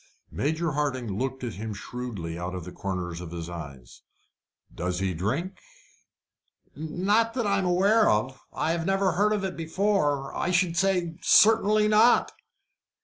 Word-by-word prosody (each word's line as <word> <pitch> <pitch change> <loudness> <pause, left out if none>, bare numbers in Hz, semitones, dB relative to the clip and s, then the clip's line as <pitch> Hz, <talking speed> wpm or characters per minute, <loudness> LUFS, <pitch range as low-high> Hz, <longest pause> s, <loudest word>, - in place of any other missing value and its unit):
Major 160 +3 -1
Hardinge 135 -6 -2
looked 130 +6 -3
at 120 -3 -4
him 105 +1 -6
shrewdly 105 -8 -6
out 90 +1 -5
of 90 -3 -6
the 90 - -8
corner 90 -2 -4
of 85 0 -7
his 85 -1 -6
eyes. 70 -8 -10 0.7
"Does 90 +1 -3
he 95 0 -1
drink?" 130 - -3 1.2
"Not 200 +9 0
that 240 -3 -1
I 200 -1 +2
am 190 - -1
aware 200 +5 +4
of. 130 +5 0
I 160 - -1
have 165 +1 -2
never 195 0 +2
heard 205 +5 +2
of 210 -2 0
it 190 - -4
before. 160 -5 0
I - - -1
should 180 -1 +1
say 180 -2 0
certainly 215 -1 +5
not." 215 +3 +4
155 Hz, 155 wpm, -26 LUFS, -, 1.2 s, certainly